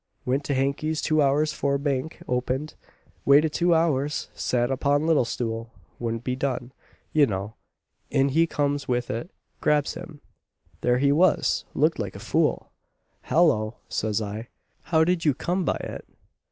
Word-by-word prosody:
Went 135 +3 0
to 140 - 0
Hankey's 140 +4 0
two 155 -1 +2
hours 150 +2 +2
'fore 140 -2 0
Bank 140 +1 -3
opened 130 +4 -1 0.5
waited 150 +2 +5
two 175 +1 +3
hours 150 -3 0
sat 120 0 0
upon 140 +3 +1
little 160 -6 +3
stool 115 -1 -3 0.3
wouldn't 115 -1 -3
be 125 0 -1
done, 130 -2 -2 0.4
you 150 -3 +5
know. 100 +1 -4 0.6
In 140 -1 +2
he 165 +4 +3
comes 145 -2 -1
with 120 -1 -1
it 120 +10 -4 0.3
grabs 150 -1 +2
him! 165 -3 -9 0.6
There 125 0 +3
he 140 +2 +3
was 165 +3 +3
looked 155 +1 +2
like 100 -3 -4
a - - -7
fool. - - 0 0.5
'Hallo!' 120 -10 +3
says 110 0 -1
I, 105 +3 -6 0.4
'how 160 -2 +3
did 175 0 +1
you 145 -4 +3
come 180 +5 -1
by - - +1
it?' - - -7
140 Hz, 155 wpm, -25 LUFS, 125-155 Hz, 0.6 s, waited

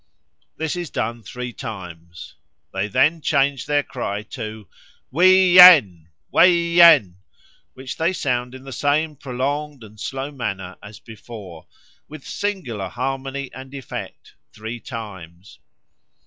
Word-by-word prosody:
This 160 0 -3
is 175 -3 -5
done 115 +1 -3
three 125 +2 -7
times. 90 -8 -9 0.4
They 95 +2 -2
then 150 - +2
change 140 -2 0
their 145 -1 +1
cry 105 -7 -5
to 110 -2 -7 0.4
'Wee 185 +4 +5
yen!' 130 - +8 0.2
'Way 180 - +6
yen!' 170 - +5 0.6
which 130 0 -8
they 165 +3 +1
sound 125 -7 -2
in 130 - -12
the 135 - -10
same 150 +4 0
prolonged 140 +1 -4
and 110 0 -15
slow 135 +5 -5
manner 95 -9 -5
as 100 +1 -12
before, 105 -7 -12 0.4
with 155 -2 -12
singular 150 - -4
harmony 135 +2 -4
and 130 +1 -10
effect, 135 -3 -8 0.2
three 110 +3 -7
times. 95 -6 -10
130 Hz, 125 wpm, -21 LUFS, 105-150 Hz, 0.6 s, yen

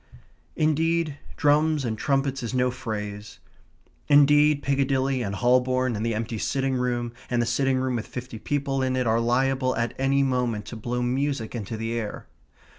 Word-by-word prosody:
Indeed, 155 -1 +1 0.2
drums 150 -1 +3
and 110 -2 -1
trumpets 135 +3 0
is 120 +1 -4
no 125 0 +2
phrase. 105 -3 -6 0.7
Indeed, 145 0 +5
Piccadilly 135 -1 +1
and 100 -4 -3
Holborn, 125 +1 +2
and 105 - -3
the 115 -1 0
empty 115 0 -3
sitting 135 +3 0
room 120 -2 -1 0.2
and 120 - 0
the 120 - +2
sitting 135 +2 +1
room 130 -1 0
with 110 - -5
fifty 125 -2 -7
people 135 +1 -1
in 130 0 0
it 130 -1 0
are 115 0 +2
liable 130 +2 +1
at 115 +1 -1
any 135 +1 +2
moment 125 -5 -1
to - - -8
blow 120 +2 -3
music 130 -1 -1
into 110 -1 -5
the 115 +1 -3
air. 115 -3 -4
130 Hz, 170 wpm, -25 LUFS, 115-140 Hz, 0.7 s, Indeed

